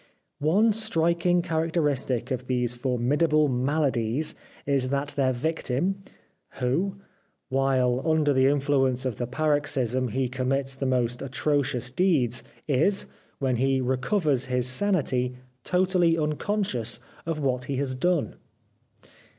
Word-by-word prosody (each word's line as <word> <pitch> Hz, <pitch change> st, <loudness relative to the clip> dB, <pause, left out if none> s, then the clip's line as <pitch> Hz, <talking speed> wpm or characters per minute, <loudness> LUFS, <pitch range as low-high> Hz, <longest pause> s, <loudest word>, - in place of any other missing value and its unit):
One 200 Hz, +10 st, +3 dB
striking 175 Hz, -4 st, +1 dB
characteristic 160 Hz, -7 st, -1 dB
of 125 Hz, 0 st, -3 dB
these 125 Hz, -2 st, 0 dB
formidable 140 Hz, +5 st, +1 dB
maladies 130 Hz, 0 st, 0 dB, 0.3 s
is 135 Hz, -2 st, +1 dB
that 140 Hz, +1 st, -1 dB
their 135 Hz, -2 st, +1 dB
victim, 160 Hz, +6 st, -1 dB, 0.5 s
who, 150 Hz, +11 st, -1 dB, 0.5 s
while 130 Hz, -2 st, +1 dB
under 155 Hz, -3 st, +2 dB
the 130 Hz, 0 st, +4 dB
influence 135 Hz, -2 st, +1 dB
of 125 Hz, -5 st, -2 dB
the 120 Hz, -, -3 dB
paroxysm 135 Hz, -3 st, 0 dB
he 130 Hz, +3 st, -1 dB
commits 135 Hz, +2 st, -1 dB
the 135 Hz, 0 st, -2 dB
most 125 Hz, -2 st, 0 dB
atrocious 130 Hz, -2 st, -1 dB
deeds, 130 Hz, -8 st, +1 dB, 0.2 s
is, 155 Hz, +8 st, +2 dB, 0.3 s
when 130 Hz, -3 st, 0 dB
he 135 Hz, +2 st, +2 dB
recovers 130 Hz, -, +1 dB
his 125 Hz, -1 st, -1 dB
sanity, 130 Hz, -6 st, +1 dB, 0.3 s
totally 180 Hz, -2 st, +2 dB
unconscious 150 Hz, -, -1 dB, 0.3 s
of 165 Hz, -2 st, -2 dB
what 125 Hz, -3 st, -1 dB
he 140 Hz, -, -3 dB
has 135 Hz, 0 st, -1 dB
done. 170 Hz, +4 st, 0 dB
135 Hz, 120 wpm, -26 LUFS, 125-160 Hz, 0.5 s, the